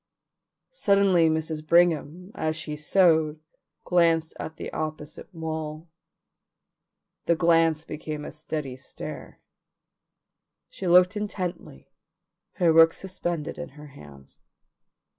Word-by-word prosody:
Suddenly 200 - +3
Mrs. 160 -1 -2
Brigham 170 +2 +2
as 155 0 -2
she 155 -1 -5
sewed 160 -1 +2 0.4
glanced 165 -2 +2
at 160 - -6
the - - -7
opposite 155 +3 -6
wall. 160 -1 -6 1.4
The 170 - +4
glance 165 -1 +3
became 150 -1 -6
a - - -7
steady 150 -4 -5
stare. 130 - -9 1.3
She 190 - -5
looked 180 +3 +5
intently, 185 - -5 0.6
her 170 -2 +3
work 165 0 +6
suspended 175 -4 -4
in 170 -1 -6
her 150 0 -11
hands. 70 - -15
160 Hz, 105 wpm, -26 LUFS, 155-175 Hz, 1.4 s, work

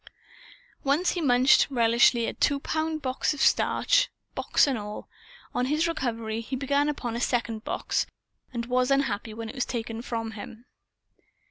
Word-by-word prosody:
Once 290 +6 +2
he 355 - -2
munched, 255 -2 +5
relishfully, 235 -1 +4
a - - -3
two 285 -1 +1
pound 315 +1 -2
box 260 +3 0
of - - -10
starch, - - +3 0.2
box - - +3
and 275 -3 0
all; 210 -1 -6 0.5
on 250 - 0
his 305 +4 +1
recovery, 230 -8 -2
he 255 +3 -5
began 280 +2 +1
upon 245 -6 -3
a 235 - -3
second 230 -3 -1
box, - - -1 0.4
and 235 -2 -3
was 250 +1 +1
unhappy 260 -6 0
when 225 +1 -6
it - - -7
was 255 -2 -1
taken 230 -1 -4
from 225 -2 -4
him. 220 +2 -10
250 Hz, 160 wpm, -27 LUFS, 230-280 Hz, 0.5 s, munched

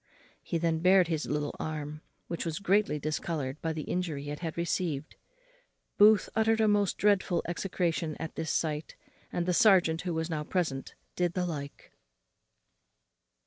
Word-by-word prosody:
He 170 - -2
then 165 -1 0
bared 180 0 +5
his 160 -2 -1
little 150 0 -2
arm, 150 -1 -4 0.2
which 170 - -4
was 165 -2 -3
greatly 200 -5 +2
discoloured 150 -2 -3
by 165 - -1
the 155 -1 -4
injury 155 -6 -3
it 145 - -5
had 165 -2 -5
received. 170 -4 -2 0.8
Booth 210 -1 +7
uttered 225 0 +3
a 220 - +4
most 205 -2 +2
dreadful 200 -4 +2
execration 170 -3 -1
at 160 - -5
this 160 -1 -4
sight, 155 -1 -1 0.4
and 175 - -1
the 180 - +1
serjeant, 180 -6 +5
who 180 -2 -3
was 160 0 -1
now 155 -3 -2
present, 150 -6 -2 0.2
did 175 -1 0
the 180 -1 0
like. 145 -5 -6
165 Hz, 155 wpm, -30 LUFS, 155-185 Hz, 0.8 s, Booth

